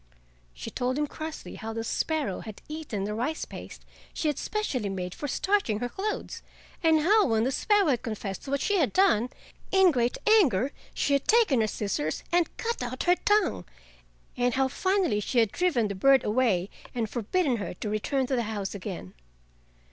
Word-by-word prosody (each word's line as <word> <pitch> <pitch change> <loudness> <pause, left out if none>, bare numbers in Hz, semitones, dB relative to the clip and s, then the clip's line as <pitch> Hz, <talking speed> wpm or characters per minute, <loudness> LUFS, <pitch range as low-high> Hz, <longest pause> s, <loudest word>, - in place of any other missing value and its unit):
She - - -7
told 255 +2 -1
him 295 - +1
crossly 315 +2 -7
how 225 0 -5
the 225 0 -3
sparrow 290 - -1
had 215 -2 -9
eaten 300 -10 -4
the 210 +1 -2
rice 255 +9 -2
paste - - -10 0.3
she 310 - 0
had 295 - -2
specially 275 - -2
made 180 -2 -4
for 290 - -5
starching 380 - +1
her 245 +3 -3
clothes, 415 - -4 0.4
and 320 -2 +4
how 415 +6 +4
when 225 -2 +2
the 260 - +1
sparrow 415 +7 +3
had 250 -4 +1
confessed 215 -4 -5
to - - -7
what 280 0 0
she 410 - +1
had 290 - +1
done, 255 - +3 0.4
in 380 -2 +6
great 245 -3 0
anger 285 - +4 0.2
she 285 - +1
had 280 - +1
taken 435 - +4
her 215 - +2
scissors 195 -8 -2
and 345 -1 +1
cut 465 0 -2
out 250 +1 -3
her 355 - +5
tongue, 415 - +1 0.7
and 245 -1 +1
how 265 0 +3
finally 375 - +1
she 225 +4 -3
had 225 -3 +4
driven 305 -12 +1
the 200 - -3
bird 270 +7 +4
away 210 -5 +1 0.2
and 230 -2 0
forbidden 250 - 0
her 200 - -5
to 210 - -5
return 235 +6 0
to 260 - -1
the 240 - +1
house 205 -3 -3
again. 185 - -7
255 Hz, 190 wpm, -27 LUFS, 215-325 Hz, 0.7 s, in